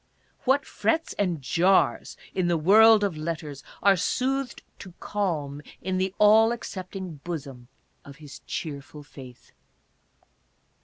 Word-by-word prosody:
What 270 +2 +2
frets 225 +11 -1
and 175 -8 -1
jars 180 +8 +2 0.2
in 185 -2 0
the 170 -1 +2
world 215 +6 +6
of 195 -5 -1
letters 155 -3 -5 0.2
are 200 0 +6
soothed 260 +7 -2 0.2
to 185 -3 -11
calm 155 -9 -3 0.2
in 185 +1 -2
the 190 0 0
all 220 +2 +6
accepting 190 -6 -6
bosom 140 -6 -7 0.4
of 140 - -12
his 145 -1 -12
cheerful 145 -1 -6
faith 130 -4 -14
180 Hz, 120 wpm, -26 LUFS, 150-205 Hz, 0.4 s, world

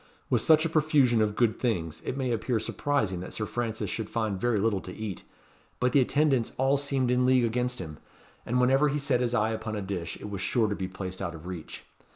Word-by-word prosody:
With - - +3
such 155 0 +5
a - - +1
profusion 145 -7 +3
of 105 -1 +1
good 115 -2 +2
things, 85 -10 -1
it 130 - -3
may 130 -2 -1
appear 115 +1 0
surprising 110 -5 -1
that 90 - -7
Sir 110 - -2
Francis 110 -3 -3
should 110 -2 -4
find 110 -4 -2
very 120 -3 +2
little 100 -2 +1
to 90 - -8
eat; 105 -1 -5 0.6
but 125 0 +2
the 140 - +5
attendants 135 -2 +2
all 135 +2 +3
seemed 135 -3 0
in 125 0 +3
league 130 -1 +4
against 125 +2 -1
him, 80 -4 -7 0.4
and 125 +2 0
whenever 135 +4 +4
he 145 - 0
set 135 -4 +1
his 125 0 0
eye 110 -1 +2
upon 110 0 -4
a - - -2
dish, 90 -4 -4
it - - -7
was 100 -2 -5
sure 110 +3 +2
to 105 - -2
be 95 - -3
placed 95 0 -6
out 85 0 -3
of 80 +1 -11
reach. 90 -3 -7
115 Hz, 230 wpm, -28 LUFS, 100-130 Hz, 0.6 s, such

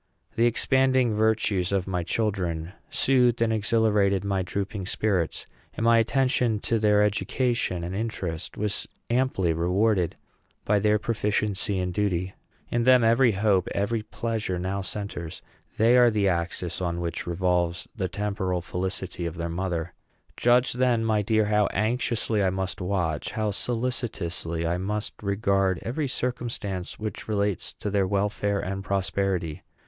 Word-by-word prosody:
The 115 +1 +4
expanding 130 0 +3
virtues 105 -4 +1
of 95 -2 +1
my 90 -2 -1
children 90 -3 -2 0.2
soothed 125 -3 +3
and 115 -1 +2
exhilarated 105 -3 +2
my 100 -1 0
drooping 100 +2 -4
spirits, 95 -6 -1 0.3
and - - -3
my 115 0 +5
attention 125 -1 +2
to 115 - 0
their 105 -1 +4
education 110 -2 0
and 85 +2 -4
interest 95 -6 -4
was 105 -1 -1 0.2
amply 120 -9 +1
rewarded 90 +2 +1 0.5
by 105 0 +3
their 105 +1 +3
proficiency 105 -2 -1
and 90 -1 -2
duty. 95 -2 -1 0.4
In 120 0 +1
them 125 0 +6
every 115 +1 +4
hope, 95 -2 +2
every 110 +3 0
pleasure, 110 -3 -3
now 95 +2 -2
centres. 95 -4 -5 0.3
They 115 +3 +5
are 120 -1 +7
the 105 -3 +1
axis 85 0 -1
on 85 -1 -1
which 85 0 -4
revolves 85 -1 0
the 95 -5 -2
temporal 100 -3 -2
felicity 90 +1 -4
of 85 0 -6
their 85 0 -3
mother. 85 -1 -3 0.4
Judge, 120 +1 +3
then, 125 -2 +2
my 110 -2 +2
dear, 110 +1 +2
how 105 -1 +3
anxiously 110 0 0
I 95 - +3
must 95 +1 -3
watch, 90 -5 -1
how 110 -1 0
solicitously 100 -8 -2
I 85 +2 0
must 105 +3 -3
regard, 100 -2 +1
every 140 +5 -2
circumstance 120 -8 -3
which 110 -2 -5
relates 100 -3 -1
to 105 - -5
their 100 -2 +2
welfare 100 +1 0
and 95 +1 -4
prosperity! 95 -4 -1
100 Hz, 145 wpm, -26 LUFS, 90-115 Hz, 0.5 s, are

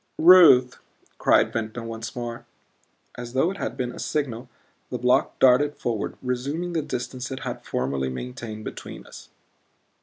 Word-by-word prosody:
"Ruth," 160 -8 +7 0.4
cried - - +3
Ventnor 115 +1 -4
once 115 0 -6
more. 120 -1 -6 0.7
As 120 0 -7
though 145 +8 +2
it 195 - -8
had - - -4
been 125 -1 -2
a - - -10
signal 130 -5 -3 0.4
the 125 - -3
block 125 +1 +2
darted 135 +3 +4
forward, 115 -4 -3
resuming 140 +8 -3
the 165 - 0
distance 125 -1 -5
it 130 - -6
had - - -5
formerly 65 +1 -2
maintained 110 - -7
between - - -8
us. - - -13
125 Hz, 150 wpm, -24 LUFS, 115-140 Hz, 0.7 s, Ruth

